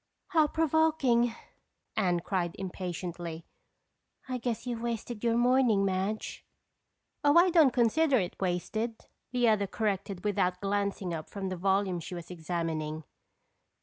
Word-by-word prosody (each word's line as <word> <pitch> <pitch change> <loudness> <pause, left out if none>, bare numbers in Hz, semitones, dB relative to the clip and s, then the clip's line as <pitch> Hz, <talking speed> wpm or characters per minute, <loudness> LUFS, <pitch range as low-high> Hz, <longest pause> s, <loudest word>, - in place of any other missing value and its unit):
"How 320 -5 +4
provoking!" 295 -7 +2 0.6
Anne 180 -5 +1
cried 175 -2 -1
impatiently. 175 -3 -5 0.8
"I 255 -1 -3
guess 235 -1 -3
you've 240 -2 -3
wasted 235 -1 -4
your 230 -1 +2
morning, 240 -4 +4
Madge." 195 +3 -2 0.8
"Oh, 290 +2 +5
I 355 +1 +6
don't 320 -5 +6
consider 260 +4 +3
it 185 -5 -2
wasted," 215 +5 -2 0.3
the 245 -1 +2
other 210 -2 +3
corrected 200 -3 -2
without 185 -3 +1
glancing 200 -2 -1
up 155 -1 -5
from 195 -2 -4
the 185 - -3
volume 190 0 +1
she 180 +2 -7
was 170 0 -8
examining. 160 -2 -3
200 Hz, 130 wpm, -30 LUFS, 180-240 Hz, 0.8 s, I